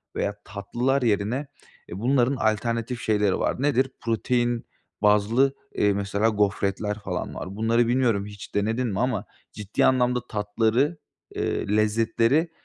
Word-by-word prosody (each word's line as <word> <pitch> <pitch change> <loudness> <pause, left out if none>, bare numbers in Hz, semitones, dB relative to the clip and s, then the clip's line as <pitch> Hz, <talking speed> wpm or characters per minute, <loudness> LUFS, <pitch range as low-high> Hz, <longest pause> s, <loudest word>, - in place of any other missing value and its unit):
veya 100 - -1
tatlılar 120 +7 -1
yerine, 115 +5 0 0.4
eee, 90 - -6
bunların 125 +3 +2
alternatif 115 +1 -1
şeyleri 105 -3 +1
var. - - -1
Nedir? 135 -2 +2
Protein 120 +1 0 0.4
bazlı, 105 +6 +3 0.2
eee, 105 -1 +3
mesela 100 +2 0
gofretler 105 0 0
falan 95 -3 -4
var. 95 +2 -6
Bunları 115 +2 +2
bilmiyorum 120 -5 +2
hiç 105 -1 -10
denedin 110 +5 0
mi 100 -3 -2
ama 120 -5 0 0.3
ciddi 105 -1 -1
anlamda 125 -1 +3
tatları, 110 +8 +1 0.4
eee, - - -1
lezzetleri 115 +8 +2
115 Hz, 130 wpm, -25 LUFS, 105-125 Hz, 0.4 s, bazlı